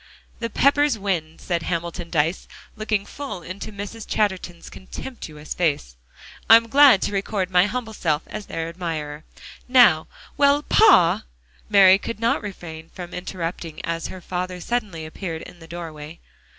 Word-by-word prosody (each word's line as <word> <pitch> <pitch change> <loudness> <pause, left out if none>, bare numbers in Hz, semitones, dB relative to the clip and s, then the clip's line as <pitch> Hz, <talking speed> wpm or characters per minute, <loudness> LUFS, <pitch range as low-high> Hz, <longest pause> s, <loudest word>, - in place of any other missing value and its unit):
"The 230 0 -3
Peppers 285 +1 +3
win," 175 -6 -2
said 175 -2 -2
Hamilton 170 0 -4
Dyce, 160 +2 0 0.3
looking 215 -2 -1
full 275 -8 -7
into 195 +5 -7
Mrs. 205 +2 -7
Chatterton's 190 -5 -2
contemptuous 160 - -8
face. 145 - -1 0.5
"I'm 230 0 +7
glad 275 -5 +7
to - - -1
record 195 -1 -2
my 180 +2 +5
humble 230 -1 -4
self 155 -6 0
as 215 -1 -8
their 165 0 -4
admirer. 160 -3 -5 0.4
Now" 245 -11 +5 0.3
"Well, 285 +1 +4
pa!" 180 - +5 0.4
Mary 195 -2 +7
could 230 0 -6
not 230 +1 +1
refrain 165 -6 -8
from 175 -1 -9
interrupting 170 -3 -5
as 165 0 -3
her 185 - -9
father 180 +1 -4
suddenly 205 -7 -3
appeared 160 0 -6
in 175 - -13
the 165 - -13
doorway. 165 -2 -8
180 Hz, 145 wpm, -23 LUFS, 165-215 Hz, 0.5 s, I'm